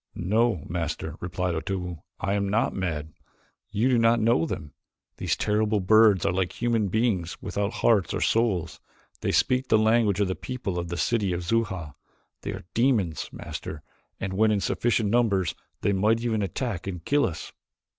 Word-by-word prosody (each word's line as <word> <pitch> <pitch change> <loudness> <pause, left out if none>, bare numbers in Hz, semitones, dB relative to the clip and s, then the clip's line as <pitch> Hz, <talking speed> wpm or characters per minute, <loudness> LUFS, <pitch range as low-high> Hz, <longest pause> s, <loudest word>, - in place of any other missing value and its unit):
"No, 105 -1 +1
Master," 80 -2 -3
replied 90 0 -2
Otobu. 90 +1 -3 0.2
"I 100 0 -1
am 100 -1 0
not 110 +3 +1
mad. 80 -5 -3 0.6
You 110 +5 +1
do 125 -3 +3
not 115 +1 +4
know 115 +8 +3
them. 75 - -6 0.4
These - - 0
terrible 105 0 +1
birds 105 0 +5
are - - +2
like 90 -1 -2
human 115 -3 +1
beings 95 -4 0
without 100 +1 -2
hearts 100 -9 +4
or - - -1
souls. 95 -9 +1 0.4
They - - -1
speak 130 0 +2
the 110 - +4
language 110 -2 +3
of 100 - +2
the 95 - -1
people 110 -6 -4
of 85 - -4
this 85 0 -1
city 105 -6 +1
of 85 0 -3
Xuja. 95 -7 -1 0.5
They - - -5
are - - -7
demons, 115 - +1
Master, 75 -2 -7 0.4
and 95 0 -3
when 110 +3 +3
in 105 -1 +2
sufficient 110 +2 +1
numbers 100 -7 +2 0.3
they 100 - +2
might 105 +4 +2
even 115 -3 0
attack 100 0 -3
and 90 -3 -5
kill 145 0 +3
us." 85 -3 -7
100 Hz, 175 wpm, -26 LUFS, 90-115 Hz, 0.6 s, birds